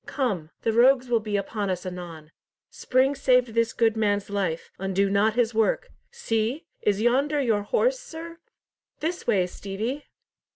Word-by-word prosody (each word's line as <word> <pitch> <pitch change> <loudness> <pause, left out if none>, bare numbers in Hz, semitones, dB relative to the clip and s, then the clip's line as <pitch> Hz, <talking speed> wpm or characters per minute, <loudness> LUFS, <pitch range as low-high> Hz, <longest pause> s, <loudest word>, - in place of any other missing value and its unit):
Come! 200 - -2
The 225 - +1
rogues 250 +2 +4
will 235 -1 +3
be 210 -1 -2
upon 200 0 -3
us 185 0 -3
anon. 170 -4 -8 0.4
Spring 260 +2 +1
saved 250 -3 +3
this 230 0 +2
good 225 -1 +2
man's 205 -2 0
life. 185 -5 -2
Undo 195 +1 0
not 210 +2 +2
his 240 -1 +1
work. 220 0 +1 0.2
See! 250 - -2 0.2
Is 210 +1 +1
yonder 280 +5 +2
your 225 -6 +1
horse, - - +1
sir? 335 -7 -9 0.6
This 335 +3 -3
way, 195 -6 +3
Stevie!" 210 +10 -5
225 Hz, 155 wpm, -25 LUFS, 200-260 Hz, 0.6 s, rogues